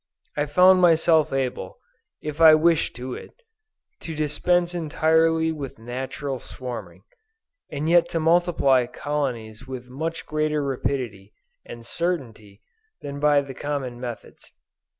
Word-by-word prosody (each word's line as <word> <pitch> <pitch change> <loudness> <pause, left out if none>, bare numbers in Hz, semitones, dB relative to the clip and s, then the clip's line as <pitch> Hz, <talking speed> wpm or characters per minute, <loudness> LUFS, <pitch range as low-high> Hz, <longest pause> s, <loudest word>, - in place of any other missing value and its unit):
I 145 0 0
found 185 +5 +6
myself 165 -2 +4
able, 135 -2 -3 0.5
if 150 +1 -5
I 160 -1 +9
wished 160 -4 +2
it, 125 0 -7 0.7
to 165 - -6
dispense 170 +4 +1
entirely 160 0 +2
with 145 -4 -6
natural 130 +3 -5
swarming, 110 -9 -8 0.7
and 150 +1 -3
yet 170 0 +4
to 165 - -1
multiply 160 -6 +3
colonies 125 -6 -4
with 125 -1 -7
much 160 +5 -4
greater 155 -1 -1
rapidity 125 -7 -3 0.3
and 120 -1 -10
certainty 120 - -4 0.4
than 140 -1 -6
by 145 -1 +4
the 140 -1 -8
common 135 -3 -4
methods. 120 -2 -9
145 Hz, 120 wpm, -24 LUFS, 125-160 Hz, 0.7 s, I